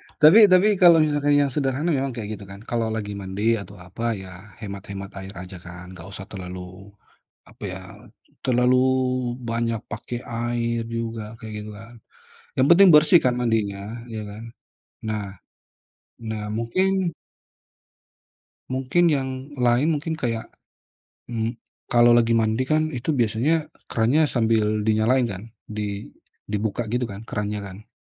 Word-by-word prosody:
Ya. - - -25
Tapi 155 +8 +9
tapi 185 +3 +6
kalau 170 -2 +9
misalkan 145 -1 +2
yang 145 - +4
sederhana 140 +3 0
memang 135 +1 -1
kayak 110 -4 -5
gitu 105 - -10
kan, 100 - -9
kalau 115 -1 0
lagi 105 -2 -4
mandi 100 +4 0
atau 100 - -12
apa, 95 +6 -6 0.2
ya 95 - -10 0.3
hemat-hemat 100 -2 -7
air 95 +1 -8
aja 90 +1 -9
kan, 90 +1 -10
nggak 90 -1 -10
usah 95 0 -7
terlalu 90 +1 -8 0.6
apa - - -21
ya, - - -6 0.7
terlalu 125 0 +3 0.7
banyak 115 0 0
pakai 120 +2 -5
air 115 0 -2
juga, 115 -1 -3 0.2
kayak 110 -2 -8
gitu 105 - -8
kan, 115 +3 -13 0.6
yang 130 - +4
penting 185 +3 +8
bersih 155 +3 +7
kan 125 - +4
mandinya, 110 -5 0 0.3
iya 110 -1 -4
kan? 105 +2 -9 0.7
Nah 105 -2 -2 1.0
nah 110 -2 -4
mungkin 185 - +1 1.6
Mungkin 135 +7 +2
yang 135 -4 +1 0.3
lain 125 +2 +3
mungkin 160 +3 -3
kayak, 115 -5 -3 0.8
mmm, 115 0 -3 0.3
kalau 120 0 +6
lagi 120 -1 +4
mandi 110 +1 +2
kan, 155 +3 +1
itu 125 +5 -2
biasanya 140 +5 +1 0.2
krannya 120 +7 +3
sambil 110 -3 +1
dinyalain 110 +4 +3
kan, 100 -4 -6 0.2
di 105 -1 -4 0.4
dibuka 105 +2 -2
gitu 120 +3 -1
kan, 100 +3 -9
krannya 105 0 -3
kan? 100 +2 -10
115 Hz, 140 wpm, -24 LUFS, 105-130 Hz, 1.6 s, Tapi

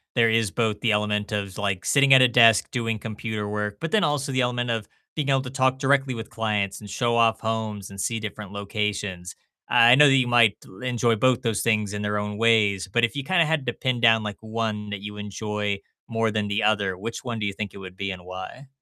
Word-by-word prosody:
there 115 -2 +4
is 110 -2 +2
both 110 0 -1
the 115 +1 +1
element 105 0 0
of, 100 -3 -3
like, 100 -3 -2
sitting 140 -1 +5
at 130 - +8
a 125 - +7
desk 115 -3 +5
doing 115 -3 -2
computer 110 -1 -5
work, 105 0 -3
but 165 - -3
then 220 -2 +3
also 145 -1 0
the 130 0 +1
element 120 0 -1
of 110 -2 -3 0.3
being 150 -3 -2
able 135 -1 +3
to 130 - -7
talk 130 0 +1
directly 135 -1 +1
with 115 -1 -7
clients, 105 -3 -2
and 105 - -11
show 120 +3 0
off 115 -1 +3
homes, 110 -3 -3
and 100 0 -11
see 115 +3 -1
different 105 -2 -7
locations. 100 -3 -4 0.3
Uh, - - -5
I 120 +1 +7
know 150 +2 +7
that 135 - +5
you 130 -2 +2
might 120 -4 +4 0.3
enjoy 120 -2 +1
both 130 +2 +2
those 115 -3 -1
things 105 -3 +1
in 105 - -4
their 105 0 -1
own 105 0 -4
ways, 105 -4 +2
but 120 +5 0
if 120 - +1
you 140 - -3
kinda 170 +3 +2
had 155 -3 -1
to 120 - -1
pin 125 -1 -2
down, 115 -2 +4
like, 105 -1 -5
one 110 -1 -3
that 100 -1 -5
you 105 0 -8
enjoy 105 0 -3 0.3
more 115 -1 0
than 105 -1 -1
the 100 +2 -1
other, 100 -3 +1
which 115 +5 -6
one 120 -3 -4
do 105 - -2
you 100 - -2
think 100 0 -6
it - - -11
would 95 -1 -10
be 100 0 -3
and 90 -1 -9
why? 95 +9 -9
110 Hz, 240 wpm, -24 LUFS, 105-120 Hz, 0.3 s, at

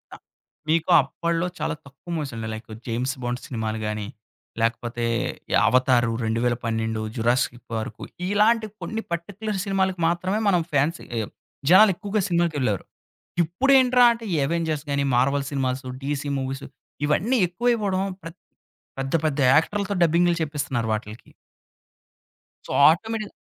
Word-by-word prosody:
అ - - -12 0.5
మీకు 160 +1 +2
అప్పడ్లో 170 +5 -2
చాలా - - -1
తక్కువ 140 +6 -12
మూవీసండి. 120 -8 -4
లైక్, 110 +1 -9 0.2
'జేమ్స్ 125 +3 -1
బాండ్స్' 120 0 -3
సినిమాలు 110 -3 -3
గాని, 105 -1 -3 0.5
లేకపోతే 120 +1 -1 0.5
ఈ - - 0
'అవతారు', 125 -2 +3
'2012', 115 -1 -1
'జురాసిక్ 120 +1 +1
పార్క్' 110 -1 -4 0.3
ఇలాంటి 215 +2 +3
కొన్ని 225 0 -3
పర్టిక్యులర్ 200 +4 -3
సినిమాలకి 190 -2 0
మాత్రమే 185 +5 0
మనం 180 -3 +3
ఫ్యాన్స్ 145 +4 +2 0.2
ఏ - - 0 0.5
జనాలెక్కువగా 200 +1 +5
సినిమాకెళ్ళారు. 150 - 0 0.6
ఇప్పుడేంట్రా 250 - +4
అంటే, 230 0 -9
ఈ - - +2
'అవెంజర్స్' 160 -1 -1
గాని, 140 0 +1
'మార్వల్' 140 +3 +2
సినిమాస్, 130 -2 -1 0.2
'డీసీ' 145 +1 -2
మూవీస్ 135 +1 -4 0.4
ఇవన్నీ 225 - +2
ఎక్కువైపోడం. 205 -1 0 0.2
ప్రత్ 165 +1 -10 0.6
పెద్ద 135 0 -3
పెద్ద 150 -2 0 0.2
యాక్టర్లతో 200 +5 +1
డబ్బింగ్లు 170 +1 +3
చెప్పిస్తున్నారు 140 -6 -2
వాటిలకి. 110 +1 -6 1.4
సో, - - -8 0.2
ఆటోమేట్‌గా 215 +5 -1
150 Hz, 120 wpm, -24 LUFS, 120-190 Hz, 1.4 s, జనాలెక్కువగా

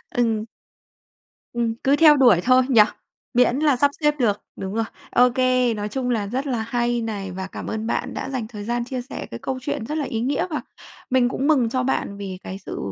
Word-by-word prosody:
Ừm. 225 -3 +1 1.1
Ừm, 235 -1 0
cứ 275 +2 +4
theo 300 -2 +7
đuổi 240 -10 +6
thôi 255 0 +5
nhỉ? 230 -5 +7 0.5
Miễn 250 +2 +3
là 295 -4 +3
sắp 285 +3 +3
xếp 295 0 +3
được, 210 -4 +1
đúng 190 +1 -5
rồi. 225 0 0 0.3
Ô 250 +1 +5
kê, 255 -1 +2
nói 210 0 -4
chung 250 +1 -2
là 215 -4 0
rất 265 +6 -3
là 240 -4 -1
hay 240 0 0
này 200 -4 -4
và 190 +1 -5
cảm - - -8
ơn 220 +1 -3
bạn - - -2
đã 265 - -4
dành 250 -5 -3
thời 210 -3 -8
gian 240 +2 -2
chia 255 -1 -4
sẻ 250 - -7
cái 115 - -6
câu 260 -1 -4
chuyện 225 - -3
rất 305 +4 -3
là 295 - -1
ý 225 -1 -3
nghĩa 275 +8 0
và 305 - -2 0.5
mình 250 -1 +3
cũng 275 +3 -1
mừng 260 -7 +3
cho 255 +1 0
bạn 200 -6 -1
vì 190 -2 -6
cái 190 - -6
sự - - -5
240 Hz, 230 wpm, -23 LUFS, 220-260 Hz, 1.1 s, theo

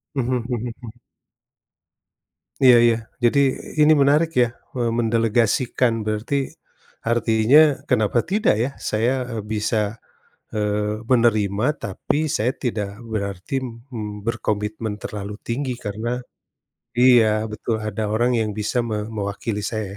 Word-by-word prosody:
Mhm 130 -1 0 0.2
mhm 120 0 -2
mhm. 120 0 -11 1.6
Iya 125 -2 +9
iya. 115 - +4 0.3
Jadi 120 +4 +4 0.4
ini 155 - +6
menarik 150 +4 +3
ya, 120 - +4 0.3
me 120 -2 0
mendelegasikan 115 +2 +2
berarti 110 +6 -1 0.8
artinya 115 +3 +4 0.3
kenapa 120 -1 +2
tidak 210 - +3
ya. 130 - -1 0.2
Saya, 115 +4 +1 0.2
eee, 115 -4 -5
bisa, 110 0 -1 0.6
eee, 105 +1 -1
menerima, 110 -3 +3 0.2
tapi 100 +9 -2 0.2
saya 120 +4 +1
tidak 110 -6 -2 0.2
berarti, 100 +4 -4
mmm, 115 -4 -7
berkomitmen 110 -2 -2
terlalu 105 -1 -6
tinggi 125 +1 -2
karena 105 +3 -3 0.9
iya 110 -4 +5
betul. 105 +2 -2
Ada 110 0 -3
orang 120 +3 +2
yang 110 -1 0
bisa 105 +4 -1
me 105 - -1 0.2
mewakili 105 +1 -3
saya 110 -1 -2
110 Hz, 115 wpm, -22 LUFS, 105-120 Hz, 1.6 s, Iya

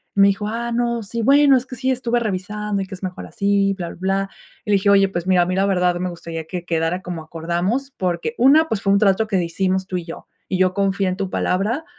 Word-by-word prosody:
me 200 0 +6
dijo: 200 +1 -2
"Ah, 235 +2 -3
no, 235 0 0
sí. 230 +3 -4
Bueno, 280 +1 +6
es 250 - -3
que 255 - -7
sí 260 +2 -2
estuve 240 -2 0
revisando, 210 -1 -3
y 190 - -9
que - - -10
es 185 - -15
mejor 185 -1 -5
así 200 0 +1
bla, 175 -3 -5
bla, - - -10
bla", 195 +1 -1 0.4
y - - -7
le - - +4
dije: 200 +1 +2
"Oye, 195 -1 +5
pues 175 -2 -4
mira, 185 -1 +4
a - - -1
mí 185 - -1
la 195 +1 +2
verdad 180 -2 +2
me 180 +1 -2
gustaría 165 -1 -7
que 175 +1 -5
quedara 165 +2 -1
como 175 -3 -6
acordamos 175 - -2
porque, 180 +5 -2
una, 290 +6 +6
pues, 205 - -1
fue 195 - +3
un 200 - +4
trato 205 +1 +3
que 190 -4 0
hicimos 190 +2 -1
tú 185 - -2
y 175 - -5
yo. 165 - -9 0.2
Y 185 - -1
yo 185 -1 +3
confié 195 0 +1
en 185 - -3
tu 195 -2 -3
palabra", 215 - -1
195 Hz, 260 wpm, -21 LUFS, 180-220 Hz, 0.4 s, me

